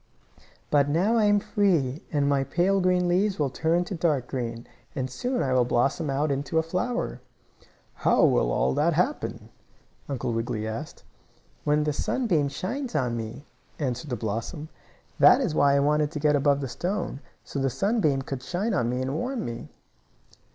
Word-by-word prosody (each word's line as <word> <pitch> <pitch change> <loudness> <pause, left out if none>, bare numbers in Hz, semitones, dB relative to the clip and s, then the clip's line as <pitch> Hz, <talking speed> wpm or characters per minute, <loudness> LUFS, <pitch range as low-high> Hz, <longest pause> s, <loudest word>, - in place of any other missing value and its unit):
"But 145 -1 +3
now 185 +10 +2
I 215 - +4
am 205 0 +4
free, 170 - +1
and 145 -2 +1
my 140 -1 +2
pale 185 +6 +1
green 180 -1 +2
leaves 190 +3 +1
will 145 -3 0
turn 165 +5 +1
to 180 - -6
dark 155 -7 0
green, 115 -3 -4 0.3
and 130 -3 -1
soon 250 - -1
I 130 - 0
will 125 -1 +4
blossom 135 +6 0
out 140 +2 0
into 140 +3 -2
a 160 - +3
flower." 185 - -2 0.7
"How - - +3
will - - +2
all 65 +2 +1
that - - +2
happen?" - - -1 0.6
Uncle 125 -3 -2
Wiggily 115 -1 -2
asked. 115 +8 -6 0.6
"When 150 0 +2
the 150 0 0
sunbeam 165 - 0
shines 240 - -4
on 125 -5 0
me," 115 +5 -6 0.3
answered 130 0 -3
the 125 - -1
blossom. 115 - -4 0.5
"That - - +7
is 245 - -1
why 140 -2 +4
I - - +4
wanted 150 +1 +2
to 150 - -3
get 150 0 +3
above 140 0 +2
the 135 - -2
stone 175 - -3 0.2
so 140 - -5
the 135 0 +1
sunbeam 155 - +1
could 135 -1 -5
shine 195 - -2
on 120 -11 +1
me 125 +1 -1
and 130 +1 -2
warm 245 - -2
me." 115 -1 -6
145 Hz, 180 wpm, -26 LUFS, 130-180 Hz, 0.7 s, That